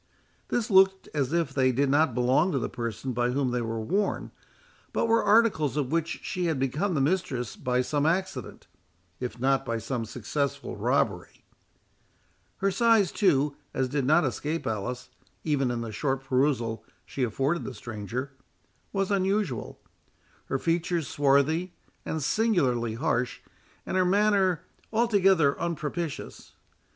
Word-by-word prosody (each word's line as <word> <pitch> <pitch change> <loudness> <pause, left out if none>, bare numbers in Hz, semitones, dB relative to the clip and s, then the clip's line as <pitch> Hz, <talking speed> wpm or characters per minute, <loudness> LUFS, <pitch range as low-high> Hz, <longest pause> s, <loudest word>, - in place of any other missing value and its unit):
This 230 -3 -1
looked 190 0 +4
as 140 -3 0
if 165 -5 0
they 130 -2 +3
did 140 +3 +1
not 145 -2 +3
belong 130 +9 +3
to - - +1
the 125 - -1
person 120 +2 -4
by 120 +1 +1
whom 130 0 0
they 125 0 0
were 115 -1 -3
worn, 195 - -1 0.6
but - - +1
were 230 0 +3
articles 205 - +3
of 140 -2 -1
which 165 0 -1
she 180 -1 -2
had 160 -3 0
become 150 +9 -1
the - - +1
mistress 135 - -1
by 125 0 0
some 145 +3 0
accident, 175 - -2 0.5
if 125 -1 -5
not 135 +2 +2
by 115 -3 -2
some 115 +1 -3
successful 130 +6 -3
robbery. - - -1 1.1
Her 195 +1 +1
size, 225 -2 +3
too, 150 -8 +2 0.2
as 130 -1 +1
did 140 +1 -1
not 155 +5 +4
escape 150 +5 -2
Alice, 125 +4 -3 0.3
even 140 -5 +1
in 120 -1 -2
the 115 -1 -5
short 135 +4 -1
perusal 125 -5 0 0.2
she 135 - -6
afforded 135 +8 0
the 130 - -6
stranger, 120 +5 -5 0.6
was 195 0 -1
unusual; 195 - -1 0.7
her 135 - -1
features 170 +1 0
swarthy 145 +5 +2 0.3
and 160 -2 -2
singularly 135 - +1
harsh, 125 +1 -1 0.4
and - - -3
her 185 - +4
manner 195 -3 +2 0.3
altogether 195 -10 +3
unpropitious. 165 -1 -4
145 Hz, 145 wpm, -27 LUFS, 125-180 Hz, 1.1 s, looked